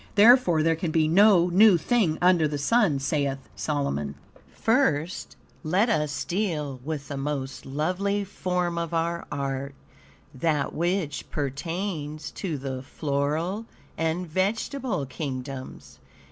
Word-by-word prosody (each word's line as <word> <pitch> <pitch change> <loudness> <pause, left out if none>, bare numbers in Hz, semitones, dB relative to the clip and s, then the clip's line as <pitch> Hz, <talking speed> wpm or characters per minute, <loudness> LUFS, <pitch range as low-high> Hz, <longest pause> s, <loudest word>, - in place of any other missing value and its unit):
Therefore, 205 -7 +6
there 165 0 +3
can 165 +1 -2
be 155 -1 +2
"no 180 0 +5
new 200 +1 +7
thing 175 -3 +1
under 180 -3 +5
the 150 0 -3
sun," 185 - +3
saith 135 0 0 0.2
Solomon. 75 - -2 0.4
First, 185 - 0 0.3
let 185 +8 +2
us 150 -8 0
deal 155 -9 -2
with 145 -1 -4
the 140 - -5
most 135 -2 -4
lovely 185 +8 -1
form 180 -3 -2
of 170 0 -3
our 170 +1 -1
art, 140 -1 -3 0.6
that 145 +1 0
which 170 -3 -1
pertains 155 +2 -4
to 170 -7 -4
the 130 -1 -4
floral 155 - -2 0.3
and 165 +2 -1
vegetable 195 - -1
kingdoms. 130 -1 -6
160 Hz, 120 wpm, -26 LUFS, 140-185 Hz, 0.6 s, new